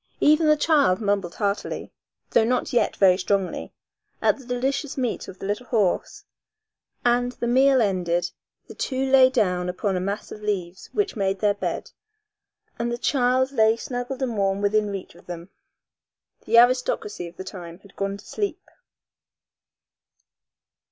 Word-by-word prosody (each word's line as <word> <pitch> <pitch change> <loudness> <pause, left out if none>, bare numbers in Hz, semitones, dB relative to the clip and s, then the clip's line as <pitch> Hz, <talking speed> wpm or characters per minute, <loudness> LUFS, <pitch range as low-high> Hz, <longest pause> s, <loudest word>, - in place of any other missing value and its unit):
Even 310 +2 +4
the 305 0 +5
child 290 - +3
mumbled 200 -5 -1
heartily, 200 -1 -2 0.4
though 230 - +4
not 250 +3 0
yet 240 - +2
very 185 -2 +5
strongly, 195 0 -1 0.5
at - - +2
the 265 - -13
delicious 270 +3 -2
meat 250 -3 -2
of 190 - -10
the - - -7
little 210 +5 -3
horse, 210 -7 0 0.8
and, 245 +1 +2
the 240 - -4
meal 260 +1 +4
ended, 175 -3 0 0.4
the - - -10
two 265 0 -2
lay 260 -1 +7
down 180 -8 0
upon 190 +2 -1
a - - 0
mass 200 +3 -4
of 210 - -8
leaves 190 -4 -3
which 415 -1 -1
made 195 -2 0
their 205 0 +3
bed, - - -4 0.9
and 235 0 -1
the 240 - -2
child 260 0 +2
lay 220 -3 +3
snuggled 245 +2 -4
and 240 -3 -2
warm 195 0 +1
within 210 +1 +1
reach 195 -2 -6
of - - -19
them. 175 +1 -8 0.9
The 230 - +3
aristocracy 240 -6 +2
of 170 - -14
the - - -6
time 175 -3 -9
had 200 - -19
gone 200 0 -2
to 200 - -16
sleep. 410 -2 -4
215 Hz, 160 wpm, -24 LUFS, 195-255 Hz, 0.9 s, lay